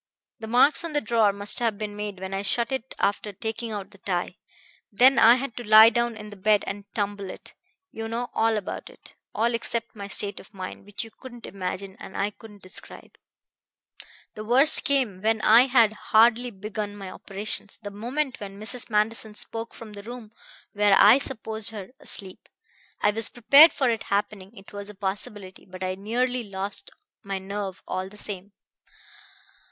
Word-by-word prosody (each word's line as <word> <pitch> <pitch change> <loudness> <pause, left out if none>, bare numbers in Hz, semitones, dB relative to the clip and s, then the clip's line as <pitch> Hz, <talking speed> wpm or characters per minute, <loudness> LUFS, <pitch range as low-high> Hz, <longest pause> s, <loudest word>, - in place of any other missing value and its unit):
The 220 - -7
marks 250 +8 +4
on 335 -2 -5
the 295 - +2
drawer 225 -4 +2
must 200 +1 -1
have 230 -4 0
been 210 -1 -5
made 205 -2 -5
when 190 +1 -6
I 195 - -2
shut 230 +4 -1
it 265 -1 -4
after 205 +1 -1
taking 220 +3 -5
out 205 -3 -6
the 200 - -18
tie. 180 -1 -3 0.5
Then 250 +4 +5
I 230 +1 +8
had 255 -2 -4
to 245 - -5
lie 220 +1 +8
down 235 -1 -1
in 210 0 -9
the - - -9
bed 205 +1 +2
and 200 +1 -7
tumble 205 -2 -3
it. - - -11 0.4
You 225 0 -6
know 235 +2 -4
all 225 -1 +2
about 205 - -6
it - - -14 0.2
all 230 +2 +1
except 230 0 -2
my 200 -1 -7
state 200 0 0
of 195 - -17
mind, 185 0 -8
which 205 +2 -5
you 225 - -12
couldn't 245 -1 -12
imagine, 190 0 -6
and - - -9
I 205 +1 0
couldn't 210 -1 -15
describe. 185 - -9 1.2
"The 215 - -7
worst 260 +7 +5
came 250 -10 +1
when 220 +1 +1
I 235 +4 +6
had 230 -5 +4 0.2
hardly 235 +2 +5
begun 210 0 -6
my 195 -2 -8
operations; 205 +1 -2
the 205 -2 -8
moment 250 +7 -3
when 200 -1 -9
Mrs. 235 +4 -1
Manderson 215 0 0
spoke 225 +2 -4
from 220 -2 -11
the 205 - -8
room 230 0 -10 0.4
where 205 -1 +4
I 215 +6 +7
supposed 220 -5 -1
her 205 -4 -8
asleep. 190 -9 -7 0.5
I 210 - +4
was 225 +1 +5
prepared 280 +7 +7
for 265 - 0
it 225 -1 -2
happening; 205 +1 -2
it 195 +2 -14
was 205 0 -4
a 210 - -11
possibility; 195 0 -5
but 185 0 -9
I 185 0 -1
nearly 245 +6 -1
lost 200 - -3 0.3
my 195 -1 -3
nerve 195 0 -6
all 185 +1 -3
the 210 - -15
same. 200 -1 -5
210 Hz, 185 wpm, -25 LUFS, 200-230 Hz, 1.2 s, I